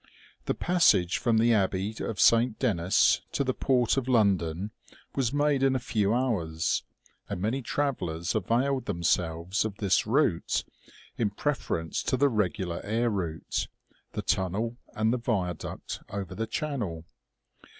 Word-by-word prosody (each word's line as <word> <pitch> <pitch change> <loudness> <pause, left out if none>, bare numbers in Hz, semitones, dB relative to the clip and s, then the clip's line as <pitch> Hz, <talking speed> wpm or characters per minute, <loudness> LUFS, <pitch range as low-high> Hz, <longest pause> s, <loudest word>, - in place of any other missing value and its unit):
The - - 0
passage 160 - +3
from 115 -2 +2
the 115 +1 +4
abbey 100 0 +1
of 110 - -4
Saint 115 0 +4
Denis 95 -8 +3
to - - +1
the 130 -1 0
port 125 -1 +2
of 130 -2 -1
London 100 -5 +2 0.4
was 130 -4 0
made 145 -1 +2
in 135 -1 +3
a - - +1
few 105 -4 0
hours, 100 -11 0 0.5
and - - -3
many 115 +8 -1
travellers 95 - -2
availed 120 +5 +1
themselves 85 0 0
of 110 -3 -3
this 100 -3 +2
route, - - +1 0.6
in 110 -3 +2
preference 100 - -2
to 130 - 0
the 140 +2 +4
regular 95 -6 -1
air 115 +3 0
route, 85 -6 -2 0.5
the - - -3
tunnel, 105 +6 -1 0.2
and 110 +2 +2
the 125 - 0
viaduct 95 -8 -3
over 100 -4 -5
the 110 +1 -3
channel. 110 - -3
110 Hz, 140 wpm, -28 LUFS, 90-125 Hz, 0.6 s, the